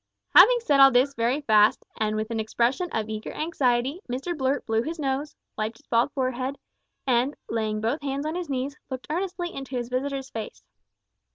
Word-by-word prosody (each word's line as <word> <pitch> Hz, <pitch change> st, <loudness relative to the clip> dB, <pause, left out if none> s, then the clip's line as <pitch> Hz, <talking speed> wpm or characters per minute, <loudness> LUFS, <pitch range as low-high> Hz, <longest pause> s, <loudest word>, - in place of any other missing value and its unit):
Having 475 Hz, +7 st, +8 dB
said 285 Hz, -11 st, +2 dB
all 270 Hz, 0 st, +10 dB
this 265 Hz, +2 st, +3 dB
very 245 Hz, +4 st, 0 dB
fast, 215 Hz, -5 st, +4 dB
and 215 Hz, -1 st, -1 dB
with 215 Hz, +1 st, -3 dB
an 225 Hz, -, -1 dB
expression 240 Hz, -, 0 dB
of 220 Hz, -1 st, -2 dB
eager 215 Hz, 0 st, -5 dB
anxiety, 275 Hz, -1 st, 0 dB
Mr 275 Hz, +8 st, -3 dB
Blurt 270 Hz, -1 st, 0 dB
blew 225 Hz, 0 st, +1 dB
his 325 Hz, +7 st, -4 dB
nose, 280 Hz, 0 st, -2 dB, 0.2 s
wiped 215 Hz, +1 st, -3 dB
his -, -, -24 dB
bald 235 Hz, +4 st, +2 dB
forehead, 260 Hz, +1 st, -2 dB, 0.5 s
and, 255 Hz, +2 st, +2 dB
laying 215 Hz, -2 st, -2 dB
both 235 Hz, +8 st, -1 dB
hands 280 Hz, +1 st, -3 dB
on 310 Hz, -, -2 dB
his 350 Hz, -2 st, -4 dB
knees, 270 Hz, +1 st, -2 dB
looked 260 Hz, -1 st, -5 dB
earnestly 350 Hz, 0 st, -3 dB
into 270 Hz, -1 st, -6 dB
his 240 Hz, -1 st, -4 dB
visitor's 270 Hz, +1 st, -3 dB
face. 220 Hz, -1 st, -7 dB
265 Hz, 185 wpm, -26 LUFS, 230-290 Hz, 0.5 s, all